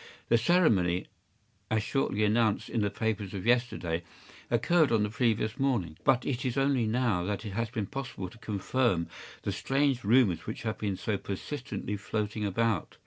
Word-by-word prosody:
The 120 - +6
ceremony, 110 - +3 0.6
as 110 -1 +1
shortly 110 -5 0
announced 110 0 +2
in 115 - 0
the 105 - +1
papers 105 -2 -2
of 95 - -5
yesterday, 120 -9 +1 0.5
occurred 150 +6 +3
on 110 -2 +3
the 105 - -1
previous 110 -2 0
morning; 115 - 0
but 125 -1 +3
it 130 -2 -1
is 130 0 -1
only 135 -4 +2
now 110 -5 +1
that 105 +2 -3
it 105 - -4
has 115 +3 -2
been 110 -2 -2
possible 120 -5 -5
to 110 +6 -14
confirm 105 -3 0 0.4
the - - -1
strange 135 -2 +1
rumors 100 -6 +3
which 110 - -5
have 110 -1 -3
been 100 -3 -1
so 105 +1 -1
persistently 105 0 -4
floating 105 +1 -3
about. 105 -1 0
110 Hz, 170 wpm, -29 LUFS, 100-125 Hz, 0.6 s, The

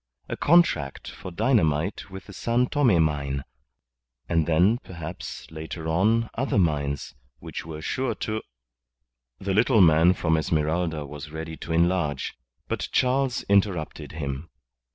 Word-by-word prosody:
A - - -3
contract 145 - +2
for 95 - -8
dynamite 85 - +1
with 95 0 -9
the 100 - -11
San 120 +5 +1
Tome 125 - +3
mine, 70 -3 -1 0.8
and 80 -2 +1
then, 90 +9 +4
perhaps, 85 -4 -7
later 80 +1 -6
on, 110 +8 +2
other 135 0 -1
mines, 75 -6 0 0.2
which - - -7
were 80 -1 -7
sure 130 -4 -1
to 110 +1 -3 1.0
The 95 0 -2
little 115 +3 +4
man 85 +1 +6
from 80 -2 +1
Esmeralda 80 0 0
was 75 +1 -8
ready 80 +1 -6
to - - -7
enlarge, 85 -4 +1 0.3
but - - -3
Charles 130 0 +1
interrupted 100 -8 0
him. 70 0 -4
85 Hz, 130 wpm, -25 LUFS, 75-105 Hz, 1.0 s, man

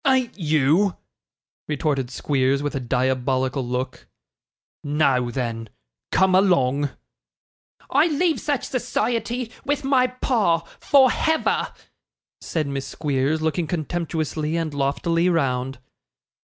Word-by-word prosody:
'Ain't 260 -3 +2
you!' 160 +3 +2 0.7
retorted 145 -4 -1
Squeers, 135 +1 0
with 145 - -2
a 135 - -2
diabolical 130 +1 0
look. 125 +1 -4 0.8
'Now 140 -4 +2
then, 115 -3 -3 0.4
come 190 0 +3
along.' 145 -7 +3 1.0
'I - - +4
leave 325 +1 +1
such 290 -3 -1
society, 240 -1 -2
with 290 0 -1
my 265 -2 +3
pa, 225 -9 +1 0.2
for 265 -3 +5
Hever,' 320 0 0 0.7
said 160 -2 -2
Miss 140 -1 -4
Squeers, 145 +1 -1
looking 160 +1 0
contemptuously 160 -1 -2
and 160 -3 -2
loftily 165 +5 +1
round. 135 -5 0
155 Hz, 105 wpm, -23 LUFS, 135-205 Hz, 1.0 s, for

